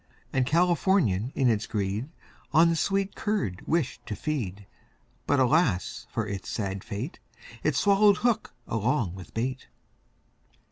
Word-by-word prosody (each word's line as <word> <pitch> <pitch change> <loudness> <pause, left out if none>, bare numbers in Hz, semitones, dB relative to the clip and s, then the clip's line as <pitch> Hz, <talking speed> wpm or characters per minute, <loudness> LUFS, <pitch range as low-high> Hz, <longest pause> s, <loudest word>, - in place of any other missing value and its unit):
And 130 -1 +2
Californian 165 - +2
in 135 - +2
its 110 -2 +1
greed, 105 +4 -2 0.4
On 165 +2 +6
the - - +1
sweet 195 +3 0
curd 195 - -2
wished 160 -6 0
to 105 - -3
feed; 105 -9 -3 0.6
But, 145 - +3
alas, 130 - +2
for 115 - -2
it's 100 -2 -5
sad 100 -3 -3
fate, 115 - -5 0.4
It 155 -3 +1
swallowed 200 +4 +5
hook 230 -1 0 0.2
along 115 - 0
with 95 -3 -10
bait. 130 +3 -2
130 Hz, 135 wpm, -27 LUFS, 105-170 Hz, 0.6 s, On